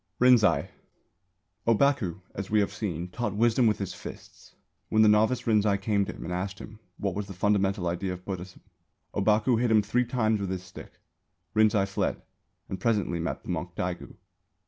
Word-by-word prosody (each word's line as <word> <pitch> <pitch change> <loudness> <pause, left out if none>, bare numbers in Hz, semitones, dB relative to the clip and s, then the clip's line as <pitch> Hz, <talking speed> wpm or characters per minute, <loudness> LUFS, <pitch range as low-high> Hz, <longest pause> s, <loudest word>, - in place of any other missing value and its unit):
RINZAI. 110 - +5 1.0
Ōbaku, 115 - +2
as 95 0 -5
we 110 - +3
have 100 - 0
seen, 90 -4 -4
taught 105 0 -3
wisdom 115 +2 +3
with 105 - +2
his 100 -3 -4
fists. - - -11 0.3
When 110 0 +4
the - - +6
novice 110 +4 +3
Rinzai 105 -3 +3
came 100 0 +1
to - - -6
him - - -9
and 90 - -4
asked 95 +2 -3
him 105 +3 -11 0.2
what 100 -2 -2
was 100 +1 -4
the 95 - -8
fundamental 95 -1 +1
idea 90 +2 -2
of 90 0 -10
Buddhism, 95 -1 -6 0.5
Ōbaku 110 +4 +2
hit 125 - +2
him 110 -2 +4
three 125 +5 +1
times 110 -3 +1
with 100 - -2
his 95 -1 -3
stick. 90 - -12 0.6
Rinzai 110 -2 +4
fled 95 - -1 0.5
and 95 - -5
presently 105 -7 0
met 85 - -3
the - - -11
monk - - -3
Daigu. - - -4
105 Hz, 180 wpm, -27 LUFS, 95-110 Hz, 1.0 s, the